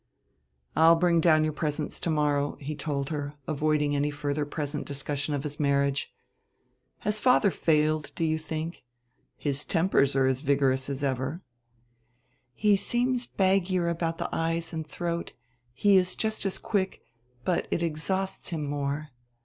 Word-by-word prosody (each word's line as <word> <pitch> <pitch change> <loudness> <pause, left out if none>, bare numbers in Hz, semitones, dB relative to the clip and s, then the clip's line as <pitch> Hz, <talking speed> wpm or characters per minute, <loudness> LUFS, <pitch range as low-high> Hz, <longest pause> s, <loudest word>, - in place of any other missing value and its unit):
"I'll 165 +1 +7
bring 170 0 +3
down 155 -2 +5
your 155 0 0
presents 150 0 -2
to - - -1
morrow," 145 -2 +1
he 150 +2 -5
told 145 -2 -3
her, 145 -2 -4
avoiding 150 -1 +1
any 145 +1 +1
further 145 0 -2
present 145 0 -3
discussion 145 +1 -1
of 140 - -3
his 150 0 -4
marriage. 140 -1 +1 0.9
"Has 210 0 +1
father 230 -4 +4
failed, 155 -2 +1
do - - -1
you 160 0 +1
think? 160 +2 -5 0.5
His 145 -1 -1
tempers 165 -6 +2
are 135 -1 +4
vigorous 135 -1 +1
as 140 0 -4
ever." 135 +6 -2 1.1
"He 210 -1 +4
seems 245 +4 0
baggier 185 -2 +1
about 165 -1 -2
the - - -2
eyes 165 0 -1
and 160 -1 -4
throat. 170 +2 -3 0.4
He 195 +11 +4
is 185 0 +1
just 220 -2 0
as 190 - -2
quick, 195 -3 -2 0.4
but 180 - 0
it 170 - 0
exhausts 190 +4 -2
him 165 -4 -3
more. 145 +1 -2
155 Hz, 150 wpm, -28 LUFS, 145-170 Hz, 1.1 s, I'll